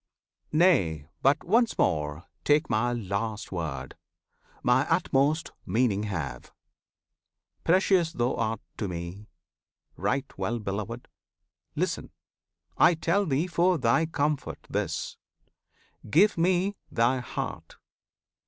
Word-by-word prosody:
Nay! 95 - +3
but 135 +2 +3
once 230 +5 +2
more 75 0 0 0.2
Take 150 -1 +3
My 110 +3 +2
last 110 -1 -3
word, 75 -8 -4 0.7
My 130 +5 +3
utmost 155 -2 +2
meaning 110 -3 +1
have! 70 -10 -5 1.1
Precious 180 -1 +3
thou 120 -1 0
art 115 0 -1 0.2
to 105 - -2
Me; 90 +4 -6 0.7
right 130 +8 0
well 110 +5 -1
beloved! 105 +3 -4 0.7
Listen! - - -2 0.7
I 175 - +6
tell 180 +5 +1
thee 145 +3 +1
for 180 0 +2
thy 130 +5 +2
comfort 150 -2 -2
this. - - -2 0.9
Give 200 - +5
Me 185 +4 +2
thy 120 +3 +2
heart! 125 - -5
125 Hz, 105 wpm, -27 LUFS, 100-165 Hz, 1.1 s, I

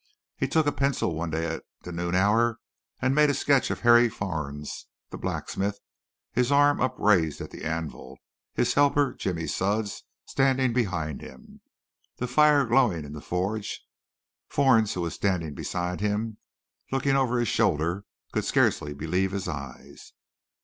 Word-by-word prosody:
He - - -1
took 160 -1 +2
a 145 - +2
pencil 140 -11 0
one 80 +1 -3
day 80 +1 -1
at 80 0 -3 0.2
the 90 - -7
noon 85 +1 -2
hour 110 +5 +3 0.5
and 130 +1 +3
made 150 +1 +5
a 145 - +1
sketch 140 0 +2
of - - -3
Harry 120 0 +6
Fornes, 75 -8 -5 0.2
the - - -6
blacksmith, 100 +1 -2 0.5
his 125 +2 +1
arm 145 0 +4
upraised 95 - +2
at - - -7
the - - -9
anvil, 80 0 -5 0.4
his - - +2
helper, 145 -1 +3
Jimmy 85 -4 -3
Sudds, 100 +3 -1 0.2
standing 135 -2 +2
behind 85 - -1
him, 65 - -13 0.6
the 125 - -2
fire 145 +2 +5
glowing 115 - +2
in 75 - -9
the 75 - -7
forge. 100 +6 -3 0.6
Fornes, 125 -7 +3
who 90 - -2
was 85 -1 -2
standing 90 -6 -1
beside 90 +3 -3
him, 105 +1 -1 0.5
looking 135 +1 +1
over 130 -2 +2
his 120 -1 +1
shoulder, 85 +4 +1 0.3
could - - -1
scarcely 75 0 +1
believe 90 +6 0
his 100 -1 -3
eyes. 70 -3 -8
100 Hz, 155 wpm, -26 LUFS, 85-130 Hz, 0.6 s, Harry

